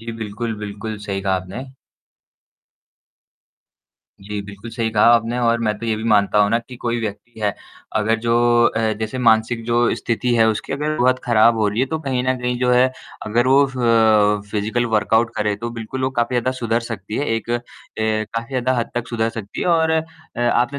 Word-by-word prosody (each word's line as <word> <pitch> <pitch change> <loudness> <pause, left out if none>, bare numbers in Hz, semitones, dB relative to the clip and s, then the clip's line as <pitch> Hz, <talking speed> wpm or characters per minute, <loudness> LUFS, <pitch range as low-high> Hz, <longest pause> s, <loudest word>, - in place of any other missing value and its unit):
जी 115 +1 -6
बिल्कुल, 110 +1 -4
बिल्कुल 105 +1 -6
सही 95 -1 -2
कहा 95 0 +1
आपने। 95 +8 -6 2.6
जी, 105 +1 -5
बिल्कुल 100 +3 -10
सही 115 -1 -2
कहा 105 -1 +3
आपने 115 +1 0
और 115 -1 +2
मैं 105 -2 0
तो 115 - -5
ये 110 - +1
भी 110 - -6
मानता 105 -1 +3
हूँ 105 0 +4
ना 115 - +3
कि 120 +1 -11
कोई 120 0 -2
व्यक्ति 110 +1 -7
है 105 -1 0 0.4
अगर 110 +1 +1
जो 115 0 +1 0.4
अ, 110 -1 +1
जैसे 110 +4 -3
मानसिक 115 -1 +2
जो 120 +1 +2
स्थिति 120 +1 -1
है 115 -1 +4
उसकी 110 +4 -2
अगर 150 +2 -2
बहुत 130 +1 +3
खराब 115 0 +4
हो 105 -1 +2
रही 105 +3 -1
है 130 - +2
तो 160 +4 -3
कहीं 130 -4 -1
न 130 0 +1
कहीं 125 0 -1
जो 125 0 +1
है 125 +1 +5 0.4
अगर 120 +3 +1
वो 135 +2 +5
फ़ 110 -5 +3
फ़िज़िकल 110 +4 -1
वर्कआउट 110 +1 +2
करे 105 -1 0
तो 120 +2 -5
बिल्कुल 115 +3 -5
वो 130 - 0
काफ़ी 120 +2 -1
ज़्यादा 120 +1 +1
सुधर 115 -1 0
सकती 110 -3 -6
है। 145 - -1
एक 115 +1 -6 0.5
ए, 110 0 0
काफ़ी 115 0 -3
ज़्यादा 130 -1 0
हद 115 - -2
तक 120 -1 -3
सुधर 115 -1 0
सकती 105 -3 -7
है - - -1
और 165 -2 +3
अ, 160 0 +2 0.4
आपने 120 +3 +1
115 Hz, 200 wpm, -20 LUFS, 110-120 Hz, 2.6 s, है